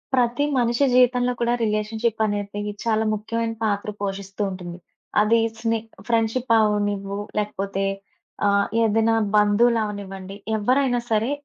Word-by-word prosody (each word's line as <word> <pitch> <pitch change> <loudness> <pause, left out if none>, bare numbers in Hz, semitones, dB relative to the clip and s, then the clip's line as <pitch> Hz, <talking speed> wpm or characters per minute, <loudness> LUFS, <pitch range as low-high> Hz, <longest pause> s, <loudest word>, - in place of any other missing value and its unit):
ప్రతి 250 +3 +2
మనిషి 240 +2 +2
జీవితంలో 250 0 +4
కూడా, 240 0 +1
రిలేషన్‌షిప్పనేది 215 -1 -1 0.2
చాలా 220 -1 +1
ముఖ్యమైన 225 +2 -2
పాత్ర 205 -1 -1
పోషిస్తూ 195 0 -4
ఉంటుంది. 180 -2 -7 0.4
అది 225 +2 +4 0.2
స్నే 225 0 0 0.3
ఫ్రెండ్‌షిపవ్వనివ్వు, 215 -4 +1 0.2
లేకపోతే 195 -1 -2 0.6
ఆహ్, 200 0 +3
ఏదైనా 225 0 +3 0.2
బంధువులవ్వనివ్వండి 205 -3 +1 0.2
ఎవ్వరైనా 250 +3 +2
సరే, 220 +4 +2
215 Hz, 100 wpm, -23 LUFS, 205-235 Hz, 0.6 s, జీవితంలో